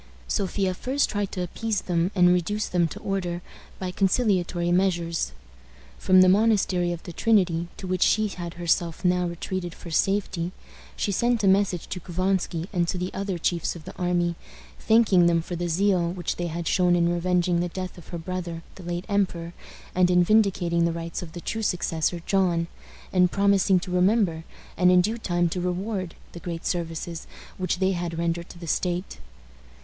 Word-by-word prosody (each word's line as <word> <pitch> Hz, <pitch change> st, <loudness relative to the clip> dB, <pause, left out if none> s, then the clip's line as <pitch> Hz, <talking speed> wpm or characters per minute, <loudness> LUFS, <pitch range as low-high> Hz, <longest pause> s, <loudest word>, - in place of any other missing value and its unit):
Sophia 195 Hz, -2 st, 0 dB
first 265 Hz, +9 st, 0 dB
tried 205 Hz, -2 st, -2 dB
to 180 Hz, -, -3 dB
appease 215 Hz, +3 st, -2 dB
them 175 Hz, 0 st, 0 dB
and 180 Hz, -1 st, +6 dB
reduce 205 Hz, +4 st, 0 dB
them 175 Hz, -2 st, +2 dB
to -, -, -8 dB
order 180 Hz, -3 st, -2 dB, 0.3 s
by 185 Hz, -1 st, -4 dB
conciliatory 185 Hz, -3 st, +1 dB
measures. 170 Hz, -, +1 dB, 0.7 s
From 185 Hz, 0 st, +5 dB
the 185 Hz, -, +7 dB
Monastery 190 Hz, -3 st, +3 dB
of 170 Hz, -1 st, -5 dB
the 175 Hz, -, -8 dB
Trinity, 180 Hz, -5 st, +2 dB
to -, -, -8 dB
which 185 Hz, -1 st, -2 dB
she 215 Hz, 0 st, +4 dB
had 175 Hz, -3 st, -6 dB
herself 175 Hz, 0 st, -1 dB
now 180 Hz, 0 st, +2 dB
retreated 175 Hz, 0 st, -4 dB
for 170 Hz, -, -10 dB
safety, 185 Hz, 0 st, 0 dB, 0.4 s
she 205 Hz, -, -1 dB
sent 235 Hz, +2 st, +1 dB
a -, -, +4 dB
message 190 Hz, -2 st, +2 dB
to 185 Hz, -, -4 dB
Couvansky 180 Hz, -1 st, -1 dB
and 175 Hz, -2 st, +1 dB
to 185 Hz, -, -2 dB
the 180 Hz, +1 st, -3 dB
other 195 Hz, -2 st, -2 dB
chiefs 170 Hz, +1 st, -1 dB
of 160 Hz, -3 st, -11 dB
the -, -, -9 dB
army, 175 Hz, -1 st, 0 dB, 0.5 s
thanking 215 Hz, -6 st, +4 dB
them 170 Hz, -1 st, +3 dB
for 170 Hz, +2 st, -5 dB
the 175 Hz, 0 st, -2 dB
zeal 180 Hz, -1 st, +2 dB
which 175 Hz, -2 st, -3 dB
they 175 Hz, -, -2 dB
had 170 Hz, 0 st, -4 dB
shown 180 Hz, -1 st, +3 dB
in 170 Hz, 0 st, +2 dB
revenging 175 Hz, 0 st, +1 dB
the 175 Hz, 0 st, -1 dB
death 185 Hz, +1 st, -5 dB
of 175 Hz, -, -14 dB
her 170 Hz, -, -5 dB
brother, 170 Hz, -1 st, -5 dB
the 190 Hz, -, -12 dB
late 175 Hz, +1 st, -4 dB
emperor, 180 Hz, -5 st, -1 dB, 0.4 s
and 180 Hz, 0 st, +3 dB
in 180 Hz, 0 st, +5 dB
vindicating 175 Hz, -4 st, +2 dB
the 170 Hz, -, +2 dB
rights 165 Hz, 0 st, -5 dB
of 170 Hz, -3 st, -9 dB
the 175 Hz, -, -7 dB
true 225 Hz, -, -3 dB
successor, 170 Hz, -3 st, -1 dB
John, 180 Hz, -4 st, +2 dB, 0.5 s
and 180 Hz, -1 st, +4 dB
promising 200 Hz, -1 st, +3 dB
to 180 Hz, -, -6 dB
remember, 180 Hz, -3 st, +2 dB, 0.3 s
and 180 Hz, 0 st, +5 dB
in 180 Hz, 0 st, +6 dB
due 220 Hz, +6 st, -2 dB
time 175 Hz, -4 st, +1 dB
to 180 Hz, +2 st, -3 dB
reward, 185 Hz, 0 st, -3 dB, 0.2 s
the 170 Hz, -, -9 dB
great 170 Hz, -1 st, -6 dB
services 165 Hz, -1 st, -3 dB, 0.3 s
which 185 Hz, -1 st, 0 dB
they 190 Hz, +1 st, +2 dB
had 175 Hz, -2 st, -3 dB
rendered 170 Hz, 0 st, -2 dB
to -, -, -11 dB
the 170 Hz, -, -8 dB
state. 180 Hz, +3 st, -2 dB
180 Hz, 185 wpm, -25 LUFS, 170-190 Hz, 0.7 s, the